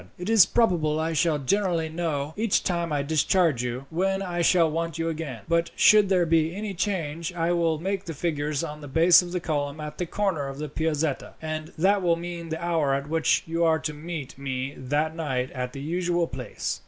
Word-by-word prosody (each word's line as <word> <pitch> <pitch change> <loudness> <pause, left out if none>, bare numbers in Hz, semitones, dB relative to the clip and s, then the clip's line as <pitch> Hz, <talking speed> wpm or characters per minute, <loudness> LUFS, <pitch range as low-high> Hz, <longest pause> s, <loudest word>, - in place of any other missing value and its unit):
"It 180 +5 -3
is 220 -6 +7
probable 165 -9 +2
I 160 +1 -1
shall 160 0 +2
generally 170 +3 0
know, 155 -3 -3
each 215 -1 +1
time 170 -2 -1
I 145 -1 0
discharge 160 -1 +2
you, 125 +2 -4
when 195 +3 0
I 175 -2 -2
shall 170 0 +4
want 165 0 -2
you 165 0 -1
again; 155 -8 -5
but 170 0 +1
should 210 -2 +6
there 180 -3 +3
be 165 +1 +2
any 205 0 -4
change, 170 -4 -2
I 170 0 0
will 165 -2 +1
make 190 +4 -3
the 165 -3 -6
figures 150 -1 -1
on 150 -2 -6
the 145 - -8
base 165 +6 +6
of 175 -1 -7
the 180 - -1
column 145 -3 -2
at 150 0 -7
the 180 - -2
corner 180 -7 -1
of 135 0 -7
the 150 0 -5
Piazzetta, 155 -1 -2
and 155 0 -5
that 195 +4 +3
will 170 -2 +3
mean 170 0 -6
the 160 +1 -4
hour 160 -5 +1
at 140 +1 -4
which 160 0 +2
you 165 +1 -1
are 160 -1 +4
to 155 -1 -4
meet 150 -3 -7
me 135 0 -3
that 150 +5 -1
night 130 -6 -2
at 125 -1 -4
the 135 - -8
usual 175 +2 0
place." 130 -5 -5
165 Hz, 215 wpm, -26 LUFS, 150-175 Hz, -, is